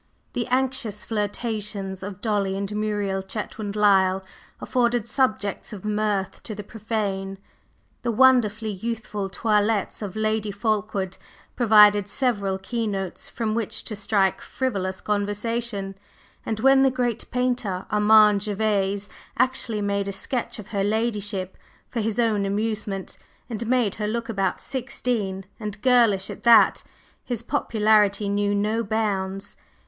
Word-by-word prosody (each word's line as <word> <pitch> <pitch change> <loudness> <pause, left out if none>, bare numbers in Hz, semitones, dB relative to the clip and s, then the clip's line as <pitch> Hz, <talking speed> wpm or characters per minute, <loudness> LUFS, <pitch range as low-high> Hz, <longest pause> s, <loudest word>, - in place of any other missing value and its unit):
The 240 - -2
anxious 250 -6 -1
flirtations 210 -3 -3
of 195 0 -7
Dolly 200 -3 0
and 200 +1 -3
Muriel 205 -2 -1
Chetwynd 210 +1 -5
Lyle 190 -2 +3 0.3
afforded 240 -2 +1
subjects 215 -5 -1
of 205 -1 -8
mirth 210 -2 -1
to 215 - -6
the 210 - -6
profane, 200 -3 -3 0.6
the 240 - 0
wonderfully 230 -3 +4
youthful 210 -1 -4
toilettes 210 0 0
of 205 -2 -5
Lady 215 -1 0
Fulkeward 205 -2 -2 0.4
provided 210 -3 +6
several 200 -5 0
keynotes 195 -2 -3
from 220 -2 -2
which 220 -1 -2
to 215 - -3
strike 200 -2 +1
frivolous 195 -8 -2
conversation, 205 0 -2 0.5
and 220 -1 -2
when 270 +1 +6
the 270 - +5
great 245 -3 -2
painter, 245 -7 -1
Armand 210 -1 +6
Gervase, 205 -1 0 0.3
actually 245 -4 +1
made 200 -1 -1
a - - -1
sketch 240 +5 -3
of 210 - -10
her 200 -2 -1
ladyship 205 -3 -1 0.3
for 240 - -3
his 220 0 -1
own 220 -4 +2
amusement, 205 -1 -3 0.3
and 225 0 -4
made 240 -5 +2
her 210 - 0
look 230 +2 -3
about 195 -4 0
sixteen, 230 -7 -2
and 210 -2 -5
girlish 235 -7 +4
at - - -9
that, 235 -1 +6 0.4
his 240 -4 -3
popularity 210 -2 +2
knew 205 0 +1
no 215 +3 +1
bounds. 200 -2 -2
210 Hz, 130 wpm, -24 LUFS, 200-230 Hz, 0.6 s, provided